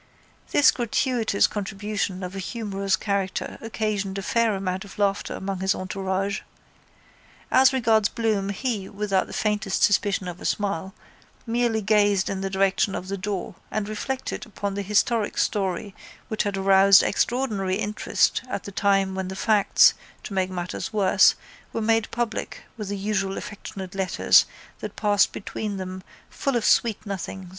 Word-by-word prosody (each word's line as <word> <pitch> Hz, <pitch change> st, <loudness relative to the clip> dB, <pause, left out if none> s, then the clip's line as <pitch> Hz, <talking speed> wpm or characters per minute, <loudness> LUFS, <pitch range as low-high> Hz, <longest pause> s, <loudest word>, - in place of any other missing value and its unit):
This 290 Hz, -, +5 dB
gratuitous 240 Hz, -3 st, +1 dB
contribution 200 Hz, -1 st, -3 dB
of 180 Hz, +1 st, -6 dB
a -, -, -4 dB
humorous 195 Hz, -2 st, -1 dB
character 195 Hz, -2 st, -2 dB
occasioned 210 Hz, -3 st, -2 dB
a 195 Hz, -, -4 dB
fair 230 Hz, 0 st, +2 dB
amount 190 Hz, 0 st, -3 dB
of 200 Hz, -, -13 dB
laughter 200 Hz, -1 st, 0 dB
among 190 Hz, -1 st, -4 dB
his 190 Hz, +1 st, +1 dB
entourage. 190 Hz, +1 st, -2 dB, 1.1 s
As 265 Hz, +1 st, +6 dB
regards 225 Hz, -5 st, +3 dB
Bloom 215 Hz, -4 st, 0 dB
he, 205 Hz, -1 st, -3 dB
without 200 Hz, -2 st, 0 dB
the -, -, -11 dB
faintest 210 Hz, -2 st, 0 dB
suspicion 200 Hz, -2 st, +2 dB
of 180 Hz, 0 st, -7 dB
a -, -, -7 dB
smile, 190 Hz, -2 st, -2 dB, 0.5 s
merely 230 Hz, -1 st, +1 dB
gazed 205 Hz, -2 st, +3 dB
in 195 Hz, -1 st, -3 dB
the 195 Hz, -, -2 dB
direction 195 Hz, +1 st, +1 dB
of 185 Hz, -, -5 dB
the 200 Hz, -, -1 dB
door 195 Hz, -1 st, -4 dB, 0.2 s
and 215 Hz, -1 st, -2 dB
reflected 255 Hz, +5 st, -4 dB
upon 200 Hz, -1 st, -4 dB
the 200 Hz, -, -3 dB
historic 210 Hz, +2 st, +1 dB
story 195 Hz, 0 st, -1 dB, 0.4 s
which 220 Hz, -, -1 dB
had 200 Hz, -1 st, -1 dB
aroused 195 Hz, 0 st, +6 dB
extraordinary 205 Hz, -6 st, 0 dB
interest 210 Hz, +1 st, +1 dB
at -, -, -3 dB
the 200 Hz, -, -7 dB
time 195 Hz, -1 st, +2 dB
when 190 Hz, -1 st, -3 dB
the 190 Hz, -, -6 dB
facts, 210 Hz, 0 st, +5 dB, 0.3 s
to -, -, -7 dB
make 190 Hz, -1 st, 0 dB
matters 180 Hz, 0 st, -4 dB
worse, 200 Hz, -2 st, +5 dB, 0.4 s
were -, -, -1 dB
made 225 Hz, 0 st, +1 dB
public 230 Hz, -1 st, -3 dB
with 210 Hz, -4 st, -6 dB
the 200 Hz, +1 st, -3 dB
usual 195 Hz, -1 st, -1 dB
affectionate 195 Hz, -2 st, -7 dB
letters 190 Hz, -1 st, +4 dB, 0.3 s
that -, -, -7 dB
passed 205 Hz, -2 st, +3 dB
between 210 Hz, 0 st, -5 dB
them 185 Hz, 0 st, -6 dB, 0.3 s
full 275 Hz, -2 st, -2 dB
of 235 Hz, -, 0 dB
sweet 230 Hz, -2 st, +2 dB
nothings. 190 Hz, -1 st, -5 dB
200 Hz, 155 wpm, -24 LUFS, 190-215 Hz, 1.1 s, As